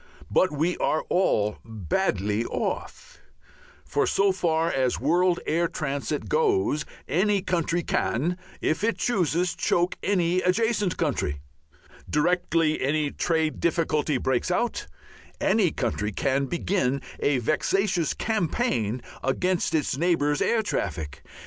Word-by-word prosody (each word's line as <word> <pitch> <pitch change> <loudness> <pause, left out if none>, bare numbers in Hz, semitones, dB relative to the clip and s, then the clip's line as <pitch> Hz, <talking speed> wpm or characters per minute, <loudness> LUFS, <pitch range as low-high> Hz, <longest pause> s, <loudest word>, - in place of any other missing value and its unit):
But 185 - +3
we 160 +4 0
are 155 - 0
all 105 - +1
badly 105 - -1
off. - - -4 0.9
So 195 0 +3
far 170 -3 +1
as 130 -2 0
world 175 +5 +2
air 170 +2 +1
transit 145 -1 -3
goes 395 - +1 0.2
any 195 +6 +2
country 170 -2 0
can, 170 +9 0 0.2
if 155 +5 0
it 230 +1 +1
chooses, 180 -5 +1
choke 175 +1 +1
any 180 -2 +1
adjacent 210 0 +1
country. 125 - -1 0.7
Directly 165 0 +1
any 145 +2 +1
trade 160 -2 0
difficulty 155 -3 +1
breaks 130 +4 0
out, 235 +7 -1 0.5
any 210 -5 +3
country 110 -6 -2
can 135 +5 0
begin 140 -5 0 0.2
a 145 -2 +2
vexatious 170 - 0
campaign 165 - -1 0.2
against 180 +7 0
its 145 -4 0
neighbour's 150 -3 +1
air 225 -1 +2
traffic. 75 - -3
165 Hz, 115 wpm, -26 LUFS, 140-185 Hz, 0.9 s, But